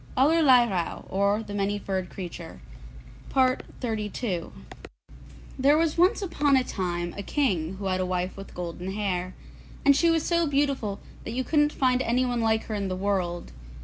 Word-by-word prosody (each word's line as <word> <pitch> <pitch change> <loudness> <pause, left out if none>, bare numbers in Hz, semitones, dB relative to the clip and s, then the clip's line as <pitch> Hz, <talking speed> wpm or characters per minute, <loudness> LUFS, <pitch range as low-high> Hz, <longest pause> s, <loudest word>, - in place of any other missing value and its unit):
ALLERLEIRAUH; 255 - +3
OR, 200 +3 +1
THE 205 - -8
MANY 205 0 0
FURRED 190 -3 -3
CREATURE 180 - -8 3.0
There 280 +3 +5
was 325 -1 +1
once 370 +5 +3
upon 290 -6 +2
a 260 - +2
time 175 -6 -3
a 200 - -4
King 190 - 0
who 195 +1 -7
had 185 -1 0
a - - 0
wife 180 0 -2
with 195 0 -10
golden 180 +2 -5
hair, 185 -3 -2 0.5
and 280 0 +7
she 335 +4 +3
was 330 -1 +2
so 340 -1 +2
beautiful 275 -8 0 0.2
that 225 - -5
you 260 - 0
couldn't 295 +1 +2
find 255 -2 +2
anyone 245 -1 +1
like 220 -1 +2
her 220 - -6
in 200 -2 -2
the 185 - -2
world. 185 -3 -2
210 Hz, 155 wpm, -26 LUFS, 185-275 Hz, 3.0 s, and